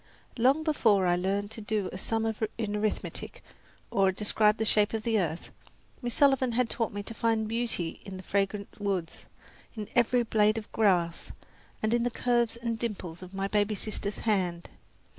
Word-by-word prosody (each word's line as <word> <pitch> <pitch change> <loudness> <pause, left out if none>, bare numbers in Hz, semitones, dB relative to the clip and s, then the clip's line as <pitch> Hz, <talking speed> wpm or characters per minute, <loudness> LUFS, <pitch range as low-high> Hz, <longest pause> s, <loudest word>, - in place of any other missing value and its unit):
Long 270 +6 +4
before 225 - +3
I 175 0 +3
learned 200 +3 -1
to 220 - -6
do 210 -2 -1
a - - -4
sum 225 +2 -1 0.3
in 210 -2 -2
arithmetic 210 0 -3 0.5
or 195 -1 +3
describe 210 +2 +2
the 220 - 0
shape 210 0 +3
of 220 - -3
the 225 -2 +2
earth, 170 -2 -3 0.5
Miss 240 -2 -2
Sullivan 270 -3 +4
had 245 0 +1
taught 230 -3 -1
me 205 0 -5
to 230 - -7
find 225 -1 +1
beauty 225 -7 -2
in 190 -1 -7
the 185 - -9
fragrant 200 +1 -2
woods, 190 -5 -3 0.5
in 215 -2 -5
every 245 0 +3
blade 215 -1 +3
of 220 - -6
grass, 180 -6 +1 0.5
and 220 +1 +2
in 240 - +3
the 245 - +1
curves 240 -1 +1
and 235 -1 -3
dimples 185 -7 -4
of 185 +1 -10
my 195 0 -1
baby 210 +1 +1
sister's 205 0 -3
hand. 180 -5 0
215 Hz, 180 wpm, -29 LUFS, 195-230 Hz, 0.5 s, Long